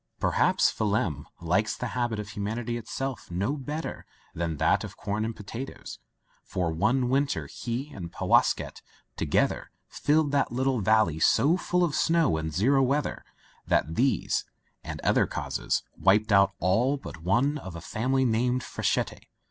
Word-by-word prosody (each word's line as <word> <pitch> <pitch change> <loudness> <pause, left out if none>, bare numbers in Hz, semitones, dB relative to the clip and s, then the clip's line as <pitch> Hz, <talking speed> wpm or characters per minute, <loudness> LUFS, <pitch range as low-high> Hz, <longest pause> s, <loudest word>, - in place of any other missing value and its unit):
Perhaps - - +3
Phelim 100 -9 -1
likes 90 +6 0
the 125 - -3
habit 120 -3 -1
of 105 -1 -5
hu 105 - -6
manity 115 +3 -2
itself 130 +2 -5
no 100 +11 -1
better 150 +3 -5 0.3
than 80 -2 -2
that - - +2
of - - -8
corn 105 +2 -2
and 115 0 -3
potatoes, 115 +6 -8 0.4
for 90 -3 -2
one 110 +10 +1
winter 140 +2 +1
he 125 +5 -5
and 85 -3 -7
Powasket - - +1 0.4
to - - -1
gether - - +1 0.2
filled 150 0 +1
that 145 - +1
little 130 -1 0
valley 105 -6 +3
so 150 - +4
full 180 0 0
of 165 -4 +1
snow 165 - +2
and 80 0 -3
zero 130 - +3
weather 140 +3 0 0.4
that 80 +5 +1
these 130 +8 +1 0.2
— - - -43
^and - - -6
other - - +3
causes - - -2
— - - -20
^wiped 105 +3 +4
out 100 -1 +5
all 115 +11 +2
but 85 - -10
one 125 - +1
of 95 -9 -8
a - - -6
family 130 +9 0
named 125 +2 +1
Frechette. - - -2
115 Hz, 165 wpm, -27 LUFS, 95-135 Hz, 0.4 s, out